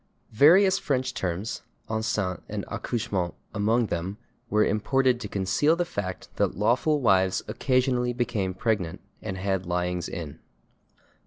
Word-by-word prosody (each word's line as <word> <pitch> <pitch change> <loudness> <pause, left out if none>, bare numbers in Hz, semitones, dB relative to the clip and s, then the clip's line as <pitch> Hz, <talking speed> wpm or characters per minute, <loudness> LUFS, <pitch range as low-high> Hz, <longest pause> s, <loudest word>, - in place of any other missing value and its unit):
Various 190 - +6
French 130 -3 -1
terms, 95 +3 -3 0.3
/enceinte/ 105 -5 -1
and - - -4
/accouchement/ 100 -7 -2 0.2
among 110 +3 +2
them, 95 +1 -3 0.3
were 105 -1 +3
imported 125 +4 +2
to 110 - -5
conceal 100 - +2
the 175 +1 0
fact 100 - -5
that - - +1
lawful 125 +8 +2
wives 95 -5 +3
occasionally 125 -2 +1
became 115 -6 -1
pregnant 100 -6 -1 0.2
and 95 - -4
had 95 -1 -1
lyings 90 0 -1
in. 80 -6 -6
105 Hz, 130 wpm, -26 LUFS, 95-125 Hz, 0.3 s, Various